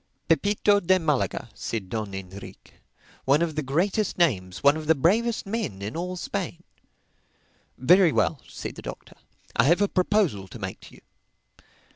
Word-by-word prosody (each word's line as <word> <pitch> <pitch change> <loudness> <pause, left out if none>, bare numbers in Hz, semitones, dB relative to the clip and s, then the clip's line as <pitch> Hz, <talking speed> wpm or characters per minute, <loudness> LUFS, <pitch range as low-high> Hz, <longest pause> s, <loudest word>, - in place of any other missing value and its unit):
"Pepito 205 +4 +3
de 185 0 +3
Malaga," 150 - -1
said 110 -3 -4
Don 105 0 -4
Enrique, 95 +1 -10 0.5
"one 145 +5 +4
of 165 -2 -2
the 155 - -2
greatest 180 +9 0
names, 95 - 0
one 140 +1 +6
of 155 -1 -6
the 160 - +5
bravest 215 - +1
men, 200 - -3
in 105 +3 -5
all 180 +2 -3
Spain." 175 -2 -4 1.1
"Very 175 +6 +5
well," 145 - +1
said - - -7
the - - -10
Doctor, - - -9 0.4
"I 115 - +4
have 170 +6 +4
a 205 - +3
proposal 180 - +1
to - - -10
make - - -6
to - - -15
you. - - -18
160 Hz, 160 wpm, -25 LUFS, 115-190 Hz, 1.1 s, one